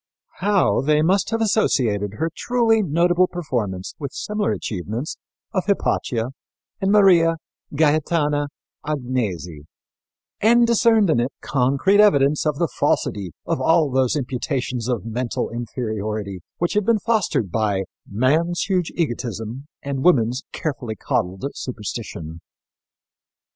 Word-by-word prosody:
How 190 Hz, -, +2 dB
they 150 Hz, +1 st, +3 dB
must 190 Hz, +4 st, +2 dB
have 225 Hz, 0 st, 0 dB
associated 110 Hz, -, +1 dB
her 160 Hz, +7 st, -1 dB
truly 230 Hz, -3 st, +2 dB
notable 175 Hz, +1 st, +3 dB
performance 115 Hz, -, -3 dB
with 140 Hz, -3 st, -4 dB
similar 210 Hz, 0 st, -1 dB
achievements 110 Hz, -, -4 dB, 0.4 s
of 185 Hz, -, 0 dB
Hypatia 125 Hz, -, 0 dB, 0.5 s
and 195 Hz, 0 st, +2 dB
Maria 175 Hz, -5 st, +5 dB, 0.4 s
Gaetana 150 Hz, -1 st, +2 dB, 0.4 s
Agnesi 110 Hz, -, -3 dB, 0.7 s
and 235 Hz, +2 st, +5 dB
discerned 225 Hz, -4 st, +4 dB
in 135 Hz, -, +2 dB
it 120 Hz, +3 st, 0 dB
concrete 140 Hz, +9 st, +2 dB
evidence 150 Hz, -7 st, +4 dB
of 150 Hz, -2 st, 0 dB
the 170 Hz, -, +1 dB
falsity 95 Hz, -, -1 dB
of -, -, -1 dB
all 160 Hz, -3 st, +3 dB
those 130 Hz, 0 st, +2 dB
imputations 125 Hz, -3 st, -2 dB
of 120 Hz, -5 st, -2 dB
mental 120 Hz, +1 st, -2 dB
inferiority 110 Hz, -4 st, -4 dB, 0.2 s
which 175 Hz, +3 st, 0 dB
had 210 Hz, 0 st, +2 dB
been 230 Hz, +3 st, +3 dB
fostered 210 Hz, -, 0 dB
by 105 Hz, -2 st, 0 dB, 0.3 s
"man's 155 Hz, +11 st, +1 dB
huge 185 Hz, -4 st, 0 dB
egotism 120 Hz, -, -3 dB, 0.2 s
and 140 Hz, -1 st, -3 dB
woman's 125 Hz, -6 st, +3 dB
carefully 125 Hz, -7 st, -4 dB
coddled 95 Hz, +2 st, -2 dB
superstition." 105 Hz, -9 st, -6 dB
140 Hz, 120 wpm, -22 LUFS, 115-175 Hz, 0.7 s, Maria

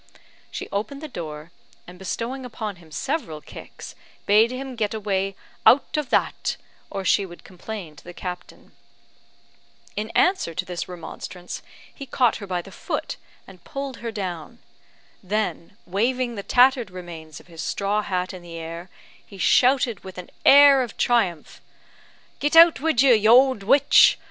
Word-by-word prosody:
She -, -, -6 dB
opened 215 Hz, +8 st, -3 dB
the 310 Hz, -, -6 dB
door, 155 Hz, -, -8 dB, 0.3 s
and 180 Hz, 0 st, -13 dB
bestowing 235 Hz, +7 st, -4 dB
upon 220 Hz, -5 st, -6 dB
him 170 Hz, -2 st, -18 dB
several 165 Hz, -, -3 dB
kicks, -, -, -11 dB, 0.3 s
bade 215 Hz, +3 st, +5 dB
him 260 Hz, +1 st, -6 dB
get 220 Hz, -2 st, -2 dB
away 195 Hz, -2 st, -2 dB, 0.3 s
"out 275 Hz, +5 st, +4 dB
of 300 Hz, -3 st, -2 dB
that," -, -, 0 dB, 0.3 s
or 195 Hz, -1 st, -5 dB
she 200 Hz, -, +3 dB
would 175 Hz, -2 st, -11 dB
complain 185 Hz, -3 st, -8 dB
to -, -, -16 dB
the 175 Hz, -, -10 dB
captain. 180 Hz, 0 st, -8 dB, 1.2 s
In 215 Hz, +1 st, -3 dB
answer 365 Hz, -, +2 dB
to 185 Hz, -, -2 dB
this 180 Hz, -2 st, -5 dB
remonstrance, 180 Hz, +1 st, -8 dB, 0.3 s
he 275 Hz, -, -9 dB
caught 245 Hz, -2 st, +2 dB
her 200 Hz, -, -9 dB
by 180 Hz, -2 st, -2 dB
the -, -, -13 dB
foot, -, -, -4 dB, 0.3 s
and 185 Hz, -2 st, -16 dB
pulled 275 Hz, -2 st, -6 dB
her 230 Hz, -1 st, -5 dB
down. 185 Hz, -1 st, -6 dB, 0.6 s
Then 200 Hz, -1 st, -3 dB
waving 240 Hz, +6 st, 0 dB
the 205 Hz, -, -5 dB
tattered 250 Hz, +1 st, +3 dB
remains 170 Hz, -4 st, -9 dB
of -, -, -18 dB
his 165 Hz, -2 st, -9 dB
straw 200 Hz, +5 st, -1 dB
hat 185 Hz, -2 st, -3 dB
in 185 Hz, -, -9 dB
the 170 Hz, -1 st, -10 dB
air, 165 Hz, +2 st, -7 dB, 0.3 s
he 200 Hz, -, -14 dB
shouted 245 Hz, +2 st, +3 dB
with 190 Hz, -1 st, -10 dB
an 180 Hz, -, -9 dB
air 280 Hz, -1 st, +8 dB
of 240 Hz, -4 st, -5 dB
triumph, 185 Hz, -10 st, 0 dB, 0.8 s
"Git 295 Hz, +2 st, 0 dB
out 330 Hz, -2 st, +8 dB
wid 280 Hz, -4 st, +2 dB
you, 265 Hz, -3 st, +6 dB
you 225 Hz, +2 st, +7 dB
ould 260 Hz, -5 st, +1 dB
witch! 275 Hz, +8 st, +5 dB
205 Hz, 160 wpm, -23 LUFS, 180-250 Hz, 1.2 s, air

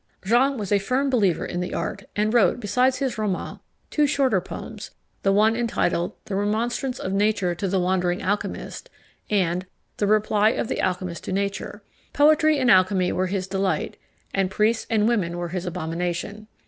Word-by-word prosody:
Jean 255 Hz, +6 st, +3 dB
was 205 Hz, -3 st, -5 dB
a 205 Hz, -, +4 dB
firm 260 Hz, +7 st, 0 dB
believer 200 Hz, -9 st, +2 dB
in 175 Hz, -, -4 dB
the 180 Hz, -, -3 dB
art, 195 Hz, -, -4 dB
and 215 Hz, +2 st, +1 dB
wrote, 240 Hz, +1 st, +4 dB
besides 250 Hz, +5 st, +1 dB
his 255 Hz, -5 st, -2 dB
Roman, 205 Hz, -4 st, -3 dB, 0.3 s
two 300 Hz, -1 st, +3 dB
shorter 260 Hz, -9 st, +2 dB
poems, 215 Hz, +3 st, -8 dB, 0.3 s
the 195 Hz, -, +2 dB
one 215 Hz, +3 st, +4 dB
entitled 225 Hz, -7 st, 0 dB
The 195 Hz, -, -4 dB
Remonstrance 230 Hz, +6 st, -1 dB
of 190 Hz, -, -4 dB
Nature 200 Hz, -3 st, +1 dB
to 195 Hz, +3 st, -3 dB
the 190 Hz, 0 st, +1 dB
wandering 180 Hz, 0 st, 0 dB
Alchymist 205 Hz, +2 st, -3 dB, 0.4 s
and 180 Hz, -3 st, +1 dB, 0.3 s
The 205 Hz, -, 0 dB
Reply 215 Hz, 0 st, +3 dB
of -, -, -3 dB
the -, -, -1 dB
Alchymist 180 Hz, -2 st, -2 dB
to -, -, -4 dB
Nature. 200 Hz, +1 st, -3 dB, 0.3 s
Poetry 310 Hz, +1 st, +4 dB
and 255 Hz, -3 st, +3 dB
alchymy 185 Hz, -1 st, +4 dB
were 185 Hz, 0 st, 0 dB
his 190 Hz, 0 st, -2 dB
delight, 190 Hz, 0 st, -1 dB, 0.4 s
and 195 Hz, -1 st, +1 dB
priests 215 Hz, +3 st, +1 dB
and 215 Hz, -1 st, +2 dB
women 185 Hz, -8 st, 0 dB
were 175 Hz, 0 st, -3 dB
his 180 Hz, +1 st, -4 dB
abomination. 175 Hz, +4 st, -4 dB
205 Hz, 175 wpm, -24 LUFS, 185-230 Hz, 0.4 s, a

